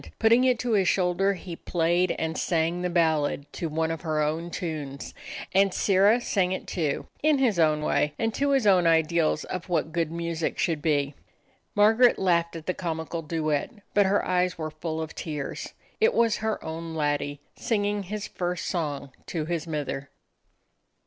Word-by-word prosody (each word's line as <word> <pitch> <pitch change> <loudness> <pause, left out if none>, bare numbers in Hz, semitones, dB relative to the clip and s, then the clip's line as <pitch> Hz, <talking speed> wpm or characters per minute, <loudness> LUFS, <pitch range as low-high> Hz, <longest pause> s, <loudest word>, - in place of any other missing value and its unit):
Put 220 - +3
ting 240 +3 +5
it 250 -2 +3
to 240 +1 -2
his 195 -4 +3
shoulder, 190 +2 +2
he 180 -2 -7
played 175 +2 +1
and 160 0 -2
sang 170 +1 0
the 180 - -1
ballad 160 -4 +1
to 165 - -3
one 160 +1 0
of 165 - -4
her 155 -2 -1
own 155 +3 -1
tunes, 155 -6 -5 0.4
and 195 +1 +4
Sirrah 200 +5 +4
sang 190 -6 0
it, - - -5
too, 155 -6 -2 0.2
in 305 -1 +4
his 240 -9 +2
own 155 -2 +3
way, 150 0 +1
and 225 -1 -1
to 280 +4 0
his 270 -4 +2
own 185 -4 +5
ideals 160 -1 +2
of 185 0 -6
what 165 -2 0
good 165 -1 -1
music 170 -1 -2
should 160 -3 0
be. 145 -3 +1 0.6
Mar 210 +1 +6
garet 245 +1 +5
laughed 170 -3 +1
at 160 -1 -7
the 185 - 0
comical 165 -1 -4
duet, 155 -2 -1 0.2
but 205 -1 +4
her 200 +1 +2
eyes 180 0 +1
were 155 -1 -4
full 160 +1 -4
of 160 - -8
tears. 150 -4 -5 0.3
It 455 +2 +3
was 230 -2 +3
her 220 -1 -2
own 165 +1 -5
laddie, 145 -1 -1 0.2
singing 205 -2 0
his 205 +2 -5
first 175 -2 -3
song 145 -5 -3 0.2
to 160 -3 -2
his 170 0 -3
mither. 145 -3 -4
170 Hz, 180 wpm, -26 LUFS, 155-195 Hz, 0.6 s, Mar